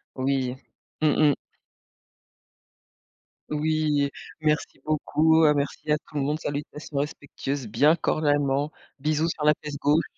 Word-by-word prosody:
Oui. 130 -1 0 0.5
Mmh 155 -1 +4 0.2
mh. - - -1 2.1
Oui 150 -1 +1 0.3
«Merci 155 0 0
beaucoup, 155 +1 +3
heu, 150 - +6
merci 145 +1 -2
à 150 - +4
tout 150 - -19
le 145 - +1
monde, 150 +3 0
salutations 145 0 -5
respectueuses, 140 -3 -3
bien 145 +9 +4
cordialement, 145 -3 +1 0.3
bisous 155 +2 +1
sur 155 - -4
la 150 - +7
fesse 150 -1 -5
gauche.» 150 +3 +3
150 Hz, 125 wpm, -26 LUFS, 140-155 Hz, 2.1 s, la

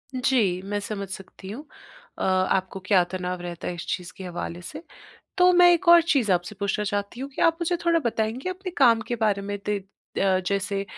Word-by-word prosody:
जी, 230 -8 +1
मैं 205 +1 -2
समझ 205 -1 -5
सकती 195 0 -9
हूँ। 245 +8 -7 0.5
अ, - - -3
आपको 190 0 +1
क्या 185 -3 +4
तनाव 180 -1 -3
रहता 175 -1 -6
है 180 - -2
इस 170 - -7
चीज़ 180 -1 -3
के 190 - -8
हवाले 175 -1 -5
से। 305 - -8 0.6
तो 360 0 +6
मैं 355 0 +7
एक 345 +1 0
और 340 -1 +9
चीज़ 270 - +1
आपसे 175 +3 -1
पूछना 200 +1 -1
चाहती 205 +4 -3
हूँ 275 +1 -5
कि 270 - -3
आप 330 -1 +4
मुझे 345 +1 0
थोड़ा 335 -1 +4
बताएँगे 230 +6 -1
अपने 370 0 -6
काम 235 -4 +5
के 240 - -1
बारे 210 -3 +1
में 205 0 -4
ते 205 0 -2 0.4
अ, 190 -1 +3
जैसे 200 0 -1
205 Hz, 210 wpm, -25 LUFS, 190-270 Hz, 0.6 s, और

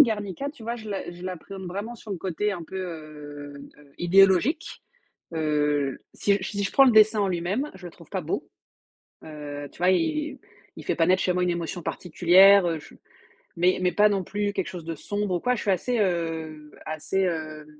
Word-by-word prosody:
Garnica, 220 +1 +1
tu 285 -6 -15
vois, 235 +1 -2
je 220 -2 -9
la 200 -2 -4
je 175 - -12
l'appréhende 185 +1 -7
vraiment 200 +6 -5
sur 220 -2 -12
le 195 - -2
côté 190 +4 -2
un 175 -3 -5
peu, 190 - -8
heu, 150 -5 -7 0.2
heu, 140 -1 -20
idéologique. 195 - +3 0.5
Heu, 150 -3 0
si 205 - +1
j - - 0
si 200 0 -2
je - - -2
prends 275 - +7
le 255 - +6
dessin 215 -1 +6
en 200 - +2
lui 175 -2 -1
même, 215 - -2
je 185 -2 -10
le 170 - -9
trouve - - -16
pas - - -2
beau, - - -3 0.8
heu, 145 -2 -7
tu - - -19
vois? 180 +1 +3
Il 305 - 0 0.4
il - - -9
fait - - 0
pas 165 - +3
naître 185 +1 +4
chez 180 - +2
moi 180 0 +1
une 180 - +1
émotion 170 +1 -4
particulière, 180 +3 +5
heu, 165 -2 -1
je 145 - -15 0.6
mais 180 +2 +3
mais 180 -1 +1
pas 210 +4 +5
non 195 -3 -1
plus 205 +1 -2
quelque 190 -4 -2
chose 175 -3 -7
de 165 -1 -5
sombre 205 +1 -2
ou - - -3
quoi. 250 - +1
Je 230 - -4
suis 205 - 0
assez, 235 +6 0
heu, 160 -5 -2
assez, 155 +5 -1
heu, 155 -3 -4
185 Hz, 215 wpm, -26 LUFS, 160-205 Hz, 0.8 s, prends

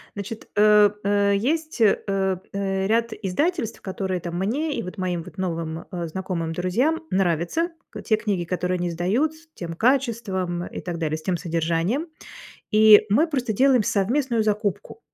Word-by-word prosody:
Значит, 205 +2 -7
э, 210 0 +6
э, 200 0 +2
есть, 310 +6 -1
э, 210 -3 +5
э, 195 0 -1
ряд 230 +1 +1
издательств, 230 - -2
которые 190 -1 -3
там 170 0 -6
мне 285 +11 -1
и - - -2
вот 180 - -8
моим 180 -2 -2
вот - - -13
новым, 165 -3 -3
э, 175 -3 -3
знакомым, 170 -2 -3
друзьям 240 - 0
нравятся: 185 - +1 0.2
к - - -7
те 220 - +2
книги, 200 -5 -2
которые 180 +1 -1
они 175 0 -2
издают, 200 - 0
с 325 +1 -19
тем 170 -2 -6
качеством 215 -7 0
и - - -7
так 175 -2 -4
далее, 155 -1 -1
с 155 - -10
тем 180 -2 0
содержанием. 170 - -1 0.6
И 215 0 +7
мы 295 +11 +4
просто 255 -7 -1
делаем 255 +1 +4
совместную 235 +4 +1
закупку. 210 - -2
200 Hz, 165 wpm, -24 LUFS, 180-235 Hz, 0.6 s, И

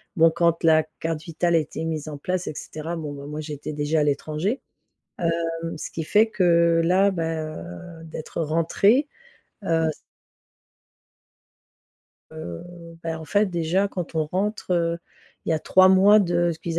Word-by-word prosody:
bon, 165 -2 +5
quand 170 0 +1
la 160 -1 +6 0.2
carte 160 -1 -2
vitale 170 +1 -1
a - - +6
été 155 +1 -5
mise 155 -2 -3
en 150 -2 -6
place 180 +4 -3
et - - -3
cetera, 155 +3 -6
bon, 155 -3 -5
ben, 140 0 -8
moi, 150 +1 -5
j'étais 150 0 -6
déjà 150 +1 0
à 150 - +3
l'étranger, 155 - -1 1.0
heu, 165 - -3
ce - - -6
qui 165 - -4
fait 215 +7 +3
que 170 -4 +3
là, 185 +4 +4
ben, 160 -3 -3 0.5
heu, - - -11
d'être 160 0 -6
rentrée, 170 - +2 0.6
heu, 165 -2 +2
ç 155 - -7 2.4
Heu, 85 - -7 0.4
beh, 165 -1 -3
en 160 0 -7
fait, 205 +7 +2
déjà 175 +2 0
quand 180 -4 -5
on 160 -1 +1
rentre, 200 +4 -2
heu, 170 -1 +1 0.5
il - - -2
y - - +4
a 160 - +1
3 185 +4 +5
mois 195 +3 +7
de 175 -2 +1
ce 160 - -10
qu'ils 165 0 -3
165 Hz, 170 wpm, -24 LUFS, 155-180 Hz, 2.4 s, mois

